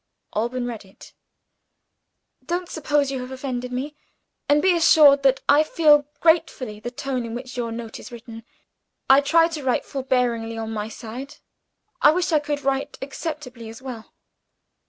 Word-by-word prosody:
Alban 240 +3 -1
read 235 -4 -6
it: 190 0 -17 1.3
"Don't 350 0 -3
suppose 290 -3 0
you 265 - -3
have 250 - -7
offended 255 -2 -5
me 275 +4 -4 0.5
and 290 +1 +5
be 360 +3 +3
assured 300 -4 +6
that 270 -1 +3
I 295 - +6
feel 300 -2 +4
gratefully 320 -10 +1
the 240 - -5
tone 260 -1 -3
in 230 0 -6
which 250 +1 -7
your 235 -2 -3
note 230 -1 -7
is - - -11
written. 230 -1 -10 0.7
I 270 +1 +7
try 330 +4 +4
to 315 -3 -6
write 255 -2 0
forbearingly 245 -4 -1
on 225 0 -4
my 210 0 -4
side; 245 +5 -8 0.7
I - - +7
wish 355 +1 0
I 310 - +4
could 290 -1 -4
write 270 0 -1
acceptably 270 -4 -6
as 225 - -10
well. 250 -4 -9
265 Hz, 160 wpm, -23 LUFS, 235-295 Hz, 1.3 s, I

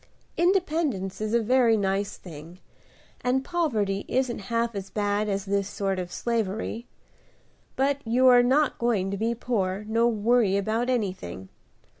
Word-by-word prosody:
Independence 315 - 0
is 215 0 -2
a 235 - +2
very 235 -1 +4
nice 200 0 -1
thing, 165 0 -11 0.7
and 260 +2 +1
poverty 220 - 0
isn't 255 -2 0
half 230 0 0
as 195 -1 -6
bad 205 0 -1
as 195 0 -2
this 200 0 -1
sort 195 -2 -2
of 175 -1 -5
slavery. 225 +1 -2 0.9
But 275 +1 +1
you 240 +3 +2
are 250 -1 +8
not 270 +4 +2
going 210 -5 0
to 200 - -2
be 230 +3 -1
poor, 205 -4 -2
nor 230 +2 +2
worry 220 -2 +2
about 220 +5 -1
anything. 185 - -3
220 Hz, 145 wpm, -26 LUFS, 195-245 Hz, 0.9 s, are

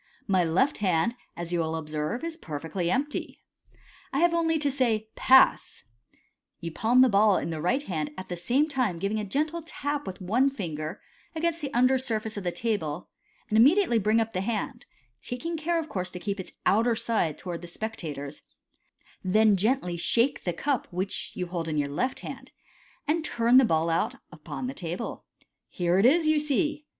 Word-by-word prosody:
My 190 -3 +3
left 180 - +1
hand, 190 +2 +2 0.2
as 170 0 -4
you 175 - +1
will 160 -1 -1
observe, 155 - -3
is 335 -1 -3
per 155 - -6
fectly 170 +3 -2
empty. 285 +9 -2 0.7
I - - -2
have 345 0 +4
only 325 -1 +2
to 290 -2 +1
say, 230 -5 0
■ - - -48
Pass! 265 0 +4
* 115 - -48
n - - -32 0.4
(You 170 -1 -5
palm 235 +9 +3
the 260 - +7
ball 205 -2 +4
in 170 - -3
the 155 -1 -4
right 250 - +1
hand, 155 - -3
at 185 - -7
the 175 - -4
same 245 - +1
time 255 - 0
giving 200 +5 -1
a - - -2
gentle 305 - -1
tap 290 -2 -4
with 185 - -6
one 230 +9 +2
finger 160 - -5 0.4
against 335 +1 -1
the 280 -2 -3
under 255 +2 +4
surface 220 -3 -2
of 200 - -4
the 175 - -1
table, 180 -8 -2 0.4
and 215 - +2
immediately 285 - +5
bring 215 +2 +3
up 225 0 -1
the 185 - -1
hand, 235 +4 -3 0.3
taking 330 +8 -4
care, 330 +2 0
of 325 -2 -2
course, 185 - -3
to 180 - -8
keep 200 +2 -3
its 190 - -8
outer 230 +3 +3
side 215 -10 0
towards 175 -2 -6
the 175 - -8
specta 175 -5 -5
tors; 140 +1 -7 0.8
then 210 +2 +4
gently 195 -3 0
shake 235 +9 +1
the 175 - +1
cup 275 +8 -1
which 185 +3 -4
you 180 - -2
hold 170 -2 -4
in 155 - -2
the 145 -1 +1
left 250 - -2
hand, - - -8 0.6
and 315 +2 +1
turn 240 -3 +3
the 265 - +8
ball 160 -5 +1
out 165 - 0 0.2
upon 150 -5 -7
the 130 - -3
table) 170 +2 -5 0.2
" - - -57
Here 175 +1 +1
it 215 - +6
is, 320 +4 +4
you 310 -1 +4
see. 300 0 0
215 Hz, 200 wpm, -27 LUFS, 175-265 Hz, 0.8 s, the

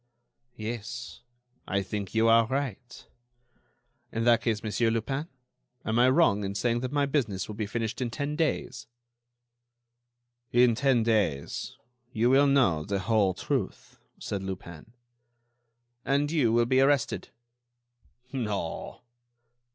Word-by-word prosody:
"Yes, 120 +2 -6 0.5
I 100 0 0
think 100 +1 -5
you 110 +1 +4
are 115 0 +5
right." 130 -1 -4 1.1
"In 115 - -2
that 120 -1 +4
case, 110 -3 -1
Monsieur 115 +2 +1
Lupin, 135 +7 -2 0.6
am 110 +2 +1
I 125 +1 +6
wrong 130 -8 +3
in 100 0 -3
saying 120 +3 +1
that 130 +1 -4
my 145 -1 +2
business 115 -10 -1
will 105 - -6
be 105 0 -3
finished 115 +1 -3
in 125 - -1
ten 145 +4 -3
days?" 150 -5 -2 1.6
"In 120 0 +5
ten 130 -1 +2
days 105 -11 -1 0.3
you 120 +2 +2
will 140 +2 +5
know 120 - +3
the 100 +5 -2
whole 100 -3 +2
truth," - - -4 0.2
said 100 -2 -4
Lupin. 95 0 -8 1.1
"And 145 +2 +1
you 140 -9 +2
will 120 +1 +3
be 130 +2 +3
arrested." 135 -2 +1 1.0
"No." 105 -10 -4
115 Hz, 130 wpm, -28 LUFS, 105-130 Hz, 1.6 s, I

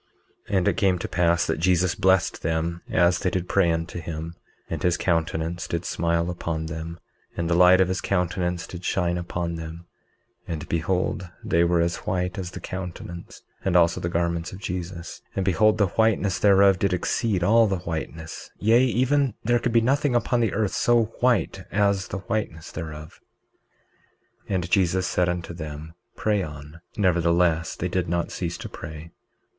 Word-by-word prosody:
19:25 100 - +2
And 90 - +1
it - - +2
came 95 -5 +3
to 90 - -4
pass 85 -1 +2
that 80 - -1
Jesus 90 0 +2
blessed 95 -2 +2
them 80 +1 -1
as 85 0 +3
they 90 - 0
did 90 -1 -2
pray 95 -4 +3
unto 80 +2 -3
him; 80 0 -5 0.3
and - - -4
his 90 -1 +2
countenance 85 0 -1
did 85 - -3
smile 85 +1 0
upon 80 -2 -3
them, 80 +1 -6 0.4
and 85 - -1
the 85 - +1
light 90 +1 +6
of 95 - +4
his 95 0 -2
countenance 90 -2 -1
did 90 0 -9
shine 90 -2 0
upon 85 -1 -3
them, 80 +1 -8 0.6
and 80 -2 -4
behold 90 +2 -1
they 85 +1 +2
were 85 0 +3
as 85 0 0
white 90 0 -2
as 90 -2 -4
the - - -8
countenance 90 -2 -7 0.2
and 95 -2 0
also 85 -1 +4
the 85 - -1
garments 85 0 -1
of 95 - -8
Jesus; 90 -2 -5
and 95 - -1
behold 105 +4 +3
the 105 - +4
whiteness 105 -1 +1
thereof 100 -2 +5
did 100 -2 +1
exceed 95 +1 0
all 115 +4 +5
the 95 -2 0
whiteness, 80 -1 -6
yea, 115 +4 +4
even 130 0 +2
there 120 +2 +2
could 120 - -1
be 115 0 +4
nothing 135 +2 +2
upon 120 0 +2
earth 105 0 -1
so 120 -1 +3 0.2
white 120 -9 +2
as 100 -2 +1
the - - -4
whiteness 90 -8 -3
thereof. 75 -1 -8 1.3
19:26 95 - 0
And 90 -1 -2
Jesus 95 -1 +2
said 90 0 +1
unto 90 -1 -3
them: 80 -1 -7 0.2
Pray 105 -2 +1
on; 75 0 -8 0.2
nevertheless 85 -3 +2
they 90 - -2
did 90 -1 -1
not 85 0 -1
cease 85 -1 -3
to - - -7
pray. 80 +2 -9
90 Hz, 175 wpm, -25 LUFS, 85-95 Hz, 1.3 s, light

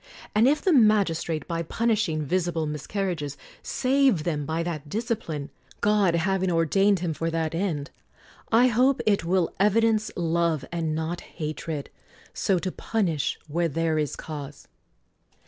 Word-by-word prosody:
And 220 +4 +5
if 295 +2 +2
the 370 - +3
magis 210 - +4
trate, 155 -4 -3
by 165 -1 -2
punishing 205 -3 0
visible 170 0 0
miscarriages, 150 0 -3 0.2
save 260 - +2
them 150 -4 -2
by 160 +1 -1
that 155 -4 -5
discipline, 215 - -3 0.3
God 205 -4 +3
having 190 +2 +1
ordained 185 +4 +3
him 170 -3 -1
for 165 +2 -2
that 160 -1 -1
end, 165 -5 -2 0.6
I 230 +2 +6
hope 255 +3 +3
it 200 -5 +2
will 180 -1 +1
evidence 215 +1 +3
love 170 -3 0
and 165 -2 -1
not 160 +2 -3
hatred, 155 -2 -5 0.4
so 190 - +1
to 185 +1 -2
punish 175 -12 -1
where 170 +3 0
there 160 0 0
is 150 -3 -1
cause. 145 -2 -8
170 Hz, 145 wpm, -26 LUFS, 155-210 Hz, 0.6 s, I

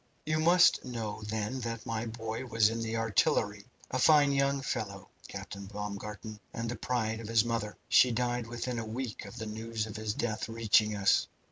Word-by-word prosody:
"You 155 0 +1
must 175 +3 +5
know, 115 -4 -4
then, 110 +4 -2
that 115 -2 -4
my 115 +1 -2
boy 115 +2 -5
was 115 -2 +4
in 115 0 -3
the 115 0 -2
artillery 105 -1 +1 0.3
a 130 - 0
fine 145 0 +6
young 140 0 +2
fellow, 100 -7 -4 0.2
Captain 100 -1 -7
Baumgarten, 105 +1 -6
and 115 +1 -3
the 120 - -2
pride 110 -1 -1
of 115 - -7
his 115 0 +3
mother. 115 -3 -2
She 125 - +6
died 120 0 -1
within 120 +1 -3
a - - -3
week 120 0 -4
of 120 - -10
the 110 - -4
news 110 0 -3
of 110 -1 -7
his 110 0 -2
death 110 -1 -2
reaching 110 -1 +3
us. 100 -1 +3
115 Hz, 190 wpm, -31 LUFS, 105-120 Hz, 0.3 s, fine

